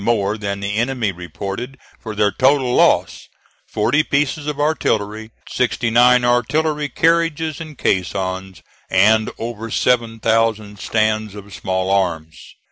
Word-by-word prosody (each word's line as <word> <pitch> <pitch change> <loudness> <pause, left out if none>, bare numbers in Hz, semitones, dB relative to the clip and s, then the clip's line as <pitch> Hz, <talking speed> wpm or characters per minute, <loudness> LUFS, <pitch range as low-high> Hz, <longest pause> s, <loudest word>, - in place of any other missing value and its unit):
more 105 -2 +1
than 100 -2 -4
the 100 +1 -2
enemy 120 -3 0
reported 100 +8 -6 0.2
for 110 -2 -7
their 105 -1 +2
total 130 0 +2
loss - - +2 0.4
40 145 +5 +1
pieces 145 +1 -1
of 150 -1 -3
artillery, 110 -8 -1 0.2
69 120 0 +3
artillery 150 +5 +1
carriages 165 0 +1
and 155 -4 -9
caissons 95 0 -2 0.3
and 110 +4 +4
over 115 -1 -5
7,000 115 -3 0
stands 110 0 0
of 100 -1 -11
small 95 0 -2
arms. 85 -4 -1
110 Hz, 120 wpm, -19 LUFS, 100-130 Hz, 0.4 s, and